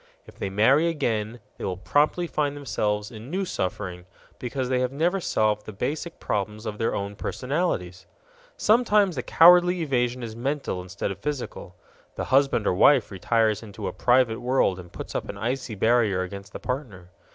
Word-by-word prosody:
If - - -16
they 100 - -2
marry 130 - +4
again, 120 -8 -2 0.2
they - - -6
will 90 -2 -2
promptly 150 - +1
find 145 -3 -1
themselves 105 -5 -2
in 110 +2 -10
new 190 +4 -1
suffering 90 - -4 0.3
because 130 +1 -3
they 130 0 +1
have 125 0 0
never 170 +7 +1
solved 105 -7 0
the - - -5
basic 150 - -4
problems 105 +2 -3
of 105 -1 -5
their 115 - 0
own 100 +1 -4
personalities. 105 - -2 0.5
Sometimes 210 -5 +3
the 125 - -2
cowardly 175 +4 +6
evasion 125 -3 0
is 110 -1 -6
mental 135 -5 -2
instead 95 +2 -4
of 100 - -7
physical. 135 -10 -5 0.4
The - - -3
husband 135 -5 +3
or - - +2
wife 125 +6 +4
retires 110 +3 +1
into 105 -2 -7
a - - -4
private 125 -2 +2
world 120 -7 +1
and 90 -1 -11
puts - - -8
up - - -3
an 100 - -6
icy 120 +1 -3
barrier 110 -3 +2
against 100 +2 -8
the - - -7
partner. 110 -10 -5
120 Hz, 175 wpm, -25 LUFS, 100-145 Hz, 0.5 s, cowardly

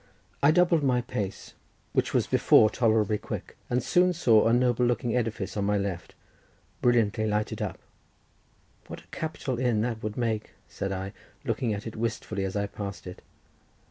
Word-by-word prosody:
I 140 - +6
doubled 170 0 +4
my 125 -3 +2
pace, 110 -6 -5 0.4
which - - +1
was - - +2
before 110 0 +5
tolerably 110 -3 +2
quick, - - -6
and 125 0 0
soon 180 0 +3
saw 115 -11 +4
a - - +3
noble 125 0 +3
looking 120 0 +1
edifice 115 -3 -2
on 100 -1 0
my 105 0 +2
left, 95 -4 -4 0.7
brilliantly 110 -3 +2
lighted 105 0 -1
up. - - -3 1.1
"What - - -8
a - - -24
capital 140 -6 -3
inn 120 -4 +1
that 115 -1 -2
would 105 0 -4
make," 110 -3 -2
said 95 - -4
I, 95 +1 -4 0.3
looking 120 -4 -1
at 105 0 -4
it 110 - -6
wistfully, 110 -3 -2
as 95 - -4
I 100 0 0
passed 100 -3 -7
it. 90 0 -9
110 Hz, 170 wpm, -27 LUFS, 105-125 Hz, 1.1 s, I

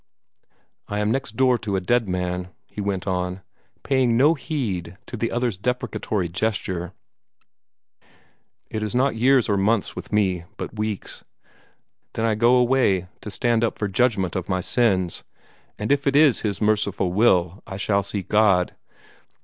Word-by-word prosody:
"I 105 - -3
am 105 +1 +1
next 135 -3 -2
door 125 -1 +3
to 105 -2 -3
a - - +2
dead 115 +3 +1
man," 90 0 -2 0.2
he 105 - -7
went 100 -3 -2
on, 90 0 -2 0.4
paying 130 -4 +2
no 145 +6 +5
heed 110 - -4
to - - -7
the 115 0 -2
other's 120 -5 -1
deprecatory 110 -5 -2
gesture. 95 -2 -2 1.8
"It 110 - -3
is 110 +3 -3
not 130 0 +2
years 125 +2 +4
or 100 - +1
months 105 +2 +1
with - - -8
me, 95 -5 +1
but - - -6
weeks. 105 -2 -4 0.9
Then 110 - -1
I 115 - +2
go 120 +3 +4
away 120 -8 +2
to - - -7
stand 115 +3 +1
up 115 - 0
for 105 - -1
judgment 100 -3 +1
on 95 - -1
my 95 -1 0
sins, 95 -5 +1 0.5
and 105 +5 -2
if 140 0 +1
it 140 - +2
is 145 -4 +5
His 100 -2 -2
merciful 100 -4 +1
will, 95 -3 +2
I 95 -3 -6
shall 100 0 +1
see 100 0 -4
God. 100 -4 +3
105 Hz, 160 wpm, -23 LUFS, 95-120 Hz, 1.8 s, no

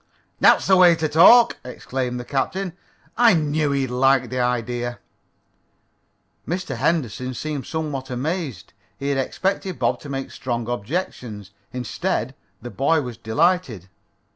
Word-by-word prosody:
"That's - - +5
the 190 - +5
way 175 -2 +7
to 160 -1 -1
talk!" 190 +11 +6
exclaimed 125 0 -4
the 125 - -7
captain. 175 +8 -2 0.5
"I 235 -5 +6
knew 150 -1 0
he'd 135 -3 -1
like 130 0 +2
the 130 - -2
idea!" 120 0 -1 1.5
Mr. 170 -6 -3
Henderson 130 -3 -1
seemed 150 0 -4
somewhat 150 -4 -4
amazed. 135 - -4 0.2
He 140 - -3
had 140 -1 0
expected 190 +6 -2
Bob - - 0
to 145 - -10
make 135 -1 -4
strong 120 -3 -4
objections. 120 - -4 0.2
Instead 125 - -2 0.3
the 120 - -7
boy 155 +4 +2
was 125 -2 -6
delighted. 120 - 0
135 Hz, 135 wpm, -22 LUFS, 125-160 Hz, 1.5 s, way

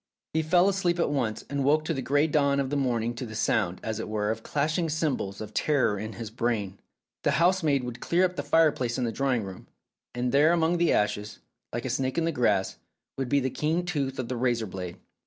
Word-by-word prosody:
He 160 - +2
fell 175 +4 +4
asleep 185 -3 +1
at 170 - +1
once, 120 -7 -1
and 140 -1 -2
woke 155 +3 +2
in 165 - 0
the 135 - -2
grey 145 +4 +2
dawn 140 -3 +2
of 135 -1 -1
the - - 0
morning 120 -4 0
to 120 +2 -5
the 110 - -8
sound, 100 -5 0
as 110 0 -3
it 110 - -5
were, 105 0 0
of 115 0 -4
clashing 155 +6 0
cymbals 150 -11 -1
of 110 0 -7
terror 130 -7 +1
in 110 +2 -5
his 115 -3 -7
brain.... 110 -5 -2 0.4
The - - +1
housemaid 165 -5 +3
would 125 0 -6
clear 175 +7 +2
up 180 0 -2
the - - -2
fireplace 145 -7 +2
in 130 - -1
the 115 - 0
drawing 125 -1 0
room, 95 -1 -9 0.5
and 125 0 -1
there 150 +4 +5
among 170 0 +2
the 170 - +3
ashes, 105 0 0 0.3
like 120 +2 -4
a - - -2
snake 130 +3 -1
in 165 - +2
the 165 - +1
grass, 125 -6 +1 0.4
would 135 -2 -3
be 140 - +3
the 130 0 -1
keen 160 +6 0
tooth 140 -7 -2
of 130 - -3
the 130 - -3
razor 120 -2 +1
blade. 90 -3 -6
130 Hz, 230 wpm, -27 LUFS, 115-155 Hz, 0.5 s, there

